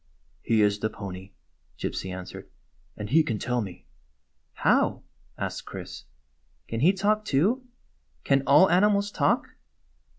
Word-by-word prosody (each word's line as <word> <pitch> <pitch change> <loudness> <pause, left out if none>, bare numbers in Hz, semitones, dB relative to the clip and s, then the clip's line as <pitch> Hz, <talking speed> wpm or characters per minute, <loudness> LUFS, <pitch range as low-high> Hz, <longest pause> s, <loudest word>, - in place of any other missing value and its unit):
"He 110 -2 +2
is 105 0 +2
the 110 - -1
pony," 95 -2 -8 0.4
Gypsy 95 - -4
answered; 90 0 -8 0.5
"and 105 +1 -6
he 160 +3 +6
can 120 -8 -2
tell 125 +2 -1
me." 95 -4 -8 0.7
"How?" - - +2 0.3
asked - - -4
Chris. - - -8 0.6
"Can 115 - -3
he 160 +9 +5
talk, 210 +2 +1
too? 215 - +1 0.6
Can 135 -1 +3
all 185 +7 +7
animals 200 +2 +3
talk?" - - +1
130 Hz, 130 wpm, -26 LUFS, -, 0.7 s, all